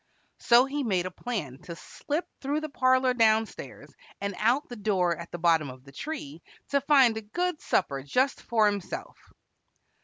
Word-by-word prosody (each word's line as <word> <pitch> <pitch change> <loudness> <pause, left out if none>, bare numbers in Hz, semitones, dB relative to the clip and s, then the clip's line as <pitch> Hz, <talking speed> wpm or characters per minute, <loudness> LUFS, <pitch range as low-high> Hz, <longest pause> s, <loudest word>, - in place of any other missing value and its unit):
So 240 +2 +5
he 285 +2 -3
made 185 -7 0
a 185 - -4
plan 180 - -5
to 170 - -8
slip 295 - -4 0.2
through 285 +3 -1
the 310 - -5
parlor 255 -1 +3
down 225 -2 +4
stairs, - - -11 0.3
and 200 0 -3
out 245 +7 +2
the 245 - -8
door 190 -5 +1
at 170 +1 -9
the - - -5
bottom 165 -4 +2
of 130 0 -12
the 140 - -15
tree 165 - -6 0.3
to 280 0 +2
find 265 -5 +4
a - - -3
good 350 +10 -2
supper 140 -7 0
just 255 - 0
for 225 -2 +2
himself. 205 -3 -3
220 Hz, 180 wpm, -27 LUFS, 175-265 Hz, 0.3 s, So